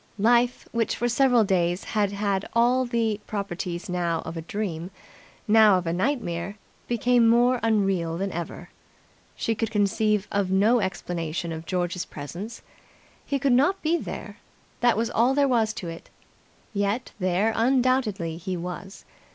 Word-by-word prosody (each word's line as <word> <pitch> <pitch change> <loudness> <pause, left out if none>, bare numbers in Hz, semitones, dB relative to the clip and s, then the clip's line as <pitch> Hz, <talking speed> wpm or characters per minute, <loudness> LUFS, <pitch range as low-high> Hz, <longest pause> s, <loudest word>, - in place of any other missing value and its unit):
Life, 240 +3 +2
which 230 -1 0
for 240 - -1
several 245 -1 +4
days 180 -2 +1
had 205 -2 0
had 200 -1 -1
all 245 +2 +3
the 230 -3 0
properties 185 -4 -4
now 170 -2 -1
of 160 - -7
a 165 - -4
dream, 175 -1 -4 0.6
now 215 -2 +6
of 180 - -3
a 165 - -1
nightmare, 190 -4 -2 0.3
became 240 0 +3
more 245 +2 +4
unreal 195 -7 +1
than 195 +2 -2
ever. 170 -1 -6 0.6
She 225 - -1
could 225 0 -2
conceive 210 0 +1 0.2
no 210 +6 +4
explanation 170 -4 -3
of 160 0 -7
George's 180 -1 -1
presence. 175 +10 -8 0.6
He 280 - -1
could 275 -1 +2
not 290 +10 +3
be 320 +2 +2
there - - -6 0.4
that 240 -2 +3
was 230 +1 0
all 245 +4 +3
there 285 -1 +3
was 230 -4 +2
to 185 - -6
it; 165 0 -8 0.6
yet 205 +4 -1
there 185 +4 +1
undoubtedly 240 -9 +1
he 185 +1 -4
was. 180 +3 -7
205 Hz, 150 wpm, -25 LUFS, 180-235 Hz, 0.6 s, now